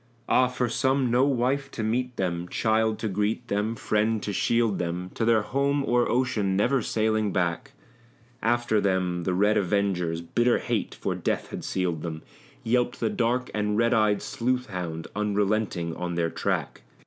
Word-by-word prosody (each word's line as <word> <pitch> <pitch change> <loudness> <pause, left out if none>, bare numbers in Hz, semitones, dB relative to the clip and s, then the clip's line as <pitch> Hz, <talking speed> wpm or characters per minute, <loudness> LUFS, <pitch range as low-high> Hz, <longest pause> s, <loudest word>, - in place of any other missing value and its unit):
Ah! 130 - +4
for 125 0 -1
some 130 0 +1
no 125 +3 +4
wife 135 +1 0
to 115 - -5
meet 125 +3 -1
them, 90 -2 -2
child 110 -1 +1
to 110 - -3
greet 105 +4 -1
them, 105 +3 0
friend 110 0 0
to 100 - -3
shield 115 +1 +1
them! 90 +1 -3
To - - -2
their 110 -2 +4
home 140 +3 0
o'er 120 0 +2
ocean 115 -6 +1
never 125 +6 +2
sailing 110 -2 0
back; 95 +10 -1 0.7
After 120 -2 +2
them 90 -3 0
the 90 - 0
red 105 +3 +3
avengers, 90 -4 0
bitter 120 +8 +2
hate - - -2
for - - -2
death - - -2
had - - -6
sealed 90 -4 -1
them, 80 -2 -5 0.4
Yelped 120 +1 +1
the 115 - 0
dark 125 +2 0
and 105 0 0
red 115 +2 +3
eyed 105 -3 +2
sleuth 125 0 -1
hound 85 -3 -4
unrelenting 105 -4 0
on 90 -1 -3
their 85 -1 0
track. - - -2
110 Hz, 170 wpm, -26 LUFS, 95-120 Hz, 0.7 s, Ah